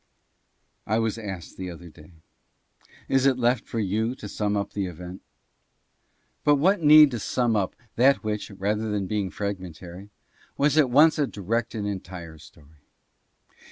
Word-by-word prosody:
I 110 - +1
was 115 0 -1
asked 95 -6 -8
the 95 -1 -5
other 85 0 -10
day, 75 +2 -17 0.9
Is 135 0 +3
it 130 -2 +2
left 120 0 +1
for 115 - -5
you 110 +4 -1
to 105 - -9
sum 105 0 -1
up 100 - -3
the 100 -2 -2
event? 90 +2 -9 1.2
But 145 - +5
what 180 +6 +2
need 150 -1 +8
to 120 - -3
sum 120 0 0
up 100 -3 -1 0.2
that 135 +2 +4
which, 105 -1 -3
rather 105 +2 -2
than 105 -2 -1
being 100 -1 -2
fragmentary, 95 -1 -7 0.5
was 145 +1 +2
at 150 -5 +4
once 155 +5 +5
a 145 - +2
direct 115 +4 -3
and 105 -2 -3
entire 90 -5 -7
story? 75 0 -19
105 Hz, 160 wpm, -25 LUFS, 95-125 Hz, 1.2 s, need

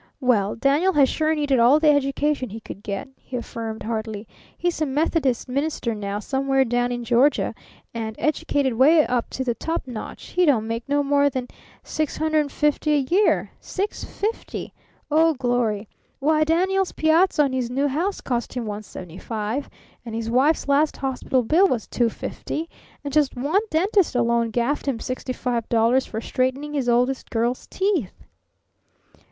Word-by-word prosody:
"Well, 225 -7 +2
Daniel 285 +10 +2
has 280 -4 +5
sure 315 0 +1
needed 285 -4 +1
all 250 +6 +6
the 305 -1 +5
education 285 -1 0
he 220 +3 -7
could 205 - -10
get," 200 +6 -5
he 250 - -7
affirmed 225 -2 -5
heartily. 220 -1 -4 0.3
"He's 350 -2 -1
a 310 - +2
Methodist 275 -3 0
minister 275 -2 -1
now 205 -1 -4
somewhere 270 +4 +1
down 245 +1 0
in 240 0 -3
Georgia 245 +5 +2 0.4
and, 220 -1 -4
educated 285 -3 0
'way 300 +6 +5
up 245 -1 -1
to 260 - -3
the 245 -2 0
top 325 +7 -3
notch, 240 -4 -8
he 360 - +2
don't 260 -10 +3
make 230 +3 -4
no 285 0 +2
more 285 0 +3
than 255 -2 -4 0.3
$650 305 -1 0
a 290 +1 +1
year. 410 +3 +3
$650! 415 +2 -4 0.4
oh, 320 +1 +4
glory! 240 -5 0 0.3
Why, 310 +2 +2
Daniel's 370 +4 +1
piazza 315 0 +3
on 275 -2 -1
his 255 -2 -1
new 275 +3 +1
house 335 +9 -1
cost 240 -2 -2
him 245 -2 -2
$175, 210 - -5 0.4
and 230 -2 -6
his 225 0 -3
wife's 280 +6 +2
last 285 +2 +2
hospital 260 -1 -1
bill 330 - +4
was 235 - -1
$250, 245 +6 -2 0.4
and 285 -2 -5
just 295 -3 +2
one 290 +11 +1
dentist 370 -1 +2
alone 235 -1 +2
gaffed 240 +6 -1
him 260 -5 0
sixty 255 +1 -4
five 245 -3 -2
dollars 235 +3 +3
for 220 - -4
straightening 260 +5 -1
his 270 -4 0
oldest 250 +2 +1
girl's 235 +2 -1
teeth!" 375 - -1
265 Hz, 160 wpm, -23 LUFS, 235-300 Hz, 0.4 s, all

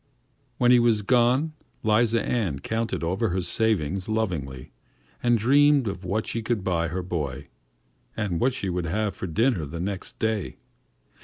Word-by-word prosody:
When 125 0 +4
he 125 - +7
was 115 -3 +3
gone, 125 +7 +3 0.3
'Liza 115 +1 +2
Ann 105 - -1
counted 115 +7 -2
over 95 +7 0
her 90 +1 -1
savings 95 -2 0
lovingly 80 - -3 0.5
and 120 -1 +3
dreamed 140 +3 +4
of 95 -1 -4
what 100 +4 -1
she 115 - -3
would 115 -5 0
buy 85 -3 0
her 90 +3 -3
boy, 70 -7 -4 0.7
and 100 -6 -1
what 130 +1 +2
she 100 - -3
would 90 -1 -2
have 105 +3 -1
for 95 - -5
dinner 110 +4 +1
on 75 - -6
the 85 - -6
next 95 +2 -5
day. 110 -2 -2
105 Hz, 165 wpm, -25 LUFS, 90-115 Hz, 0.7 s, he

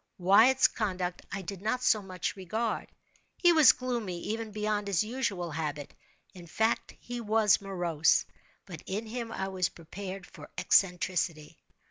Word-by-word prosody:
Wyatt's 220 +9 +6
conduct 185 -5 -3
I 195 - -4
did 190 +1 -7
not 250 +4 -1
so 215 -4 +3
much 185 -2 -4
regard. 215 +4 -3 0.5
He 350 -1 +5
was 310 -7 +8
gloomy, 235 -8 -3
even 225 +1 -4
beyond 210 -1 -2
his 200 0 +2
usual 215 -7 -3
habit—in 155 +3 -8
fact 220 +7 0
he 240 0 -6
was 215 -2 +3
morose—but 175 -1 -1
in 205 +4 -3
him 230 +1 -5
I 190 -3 -3
was 185 -2 0
prepared 190 +3 -8
for - - -13
eccentricity. 175 -4 +1
200 Hz, 135 wpm, -29 LUFS, 180-225 Hz, 0.5 s, was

